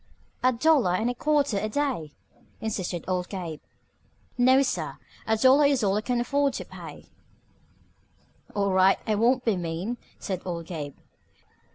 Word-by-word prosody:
"A 255 - +4
dollar 255 - +3
and 225 +6 0
a - - -4
quatter 285 -5 +1
a 215 - -2
day," 235 - -2 0.5
insisted 190 -6 -3
old 180 -1 -1
Gabe. 170 -6 -5 0.7
"No, 260 +2 +5
sir, 260 - -3 0.3
a 220 0 +2
dollar 265 +5 +6
is 275 -5 +1
all 195 -1 +2
I 210 - +1
can 245 +2 -1
afford 280 +3 +1
to - - -5
pay," - - -10
said - - -28 1.4
Philo. 200 -1 +1
"All 200 - +1
right, 190 +1 +5
I 220 - +1
won't 245 +4 +2
be 225 -4 +2
mean," 175 +7 -3 0.2
said 185 -2 -4
old 170 -2 -4
Gabe. 150 -5 -6
215 Hz, 165 wpm, -26 LUFS, 185-255 Hz, 1.4 s, dollar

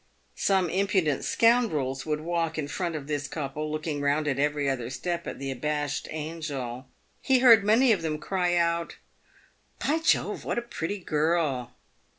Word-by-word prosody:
Some 190 -2 +2
impudent 190 - +1
scoundrels 160 - +2
would 150 0 -1
walk 165 -1 -1
in 150 -2 -2
front 170 +2 -3
of 145 -3 -5
this 145 -1 -3
couple, 150 0 -4
looking 155 -1 -3
round 145 +2 +1
at 135 -2 0
every 145 0 +1
other 125 -3 -1
step 170 +7 -3
at - - -5
the 135 0 -4
abashed 145 +2 -2
angel. 150 -5 -5 0.3
He 265 - +3
heard 235 -4 +7
many 230 +5 +4
of 200 -6 +2
them 155 -2 -2
cry 180 +2 0
out, 170 0 0 0.5
" - - -36
By 310 +3 +2
Jove! 320 - +1
what - - -2
a 240 - -1
pretty 205 -4 -4
girl 150 -7 0
155 Hz, 165 wpm, -27 LUFS, 145-180 Hz, 0.5 s, heard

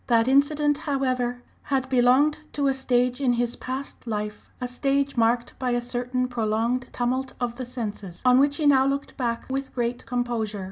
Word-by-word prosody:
That 230 -1 +3
incident, 290 +2 +3
however, 255 -5 -1 0.2
had 270 -3 -1
belonged 260 +4 +4
to 285 - 0
a 270 - +3
stage 250 0 +1
in 250 -3 +3
his 240 0 0
past 260 -1 -6
life, 210 -1 -4
a 250 - -2
stage 275 +2 0
marked 235 +1 +2
by 255 - -1
a 240 - +2
certain 245 +1 -2
prolonged 235 +2 0
tumult 255 +2 -1
of 240 -1 -2
the 255 -2 -5
senses, 210 -7 -6
on 250 0 +6
which 285 +1 +3
he 310 - -1
now 270 -2 +5
looked 280 +1 -2
back 235 -3 -2
with 270 0 -4
great 240 -1 -2
composure. 235 -4 -2
250 Hz, 180 wpm, -25 LUFS, 240-270 Hz, 0.2 s, on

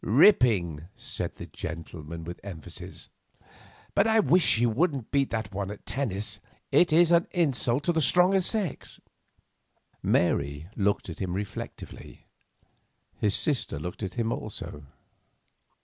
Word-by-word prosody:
"Ripping," 105 - +4
said - - -5
that - - -10
gentleman, 80 0 -7
with 85 +2 -7
emphasis. 90 -6 -8 0.8
"But - - +3
I 220 0 +4
wish 185 -3 +4
she 115 +2 +5
wouldn't 130 +1 0
beat 140 -1 +1 0.2
one 100 0 -3
at 105 - -9
tennis; 110 -7 -3 0.3
it 175 - +4
is 170 +2 +5
an 170 +1 +4
insult 140 -6 +1
to 175 - +1
the 160 - +1
stronger 180 +5 +5
sex." 190 -4 0 1.0
Mary 70 +3 +1
looked 100 0 0
at 85 - -7
him 95 -2 -2
reflectively. 100 +2 -7 0.9
His 105 -1 +1
sister 145 - -1
looked 90 +8 -6
at 95 -3 -4
him 115 -1 -1
also. 75 -11 -6
110 Hz, 130 wpm, -27 LUFS, -, 1.0 s, she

